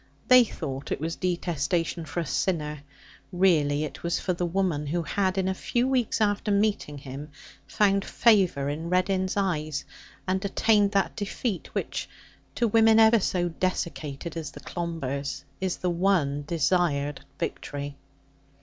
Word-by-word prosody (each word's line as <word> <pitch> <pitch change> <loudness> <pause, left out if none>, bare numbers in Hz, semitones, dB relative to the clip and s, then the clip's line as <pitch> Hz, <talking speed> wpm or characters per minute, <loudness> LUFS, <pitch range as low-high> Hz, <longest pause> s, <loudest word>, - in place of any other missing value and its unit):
They 255 -1 +9
thought 135 - -6
it - - -1
was 165 +2 -3
detestation 170 -2 -1
for 170 +3 -3
a - - -4
sinner. 150 -2 -1 0.5
Really, 155 -6 +3
it 155 - -6
was 170 0 0
for 185 - -1
the 175 0 -1
woman 170 -5 0
who 170 +3 -1
had, 190 +4 0
in 190 -1 +1
a 190 - +1
few 240 +6 0
weeks 255 -4 +1
after 205 0 +1
meeting 200 -7 +1
him, 140 +2 -8 0.4
found 200 -1 +2
favour 190 -14 +3
in 155 +4 -3
Reddin's 185 +1 +1
eyes, 155 -7 -1 0.4
and 190 +1 0
attained 205 0 +3
that 195 -1 +1
defeat 205 -2 -3
which, - - -3 0.5
to 235 - +2
women 225 0 +5
even 220 0 +6
so 175 -1 0
desiccated 170 -3 -3
as 160 -4 -4
the - - -11
Clombers, 140 -5 -4 0.2
is 190 -1 -1
the 180 - -1
one 170 -6 +1
desired 150 -4 +1
victory. 145 -1 -4
175 Hz, 150 wpm, -27 LUFS, 150-195 Hz, 0.5 s, They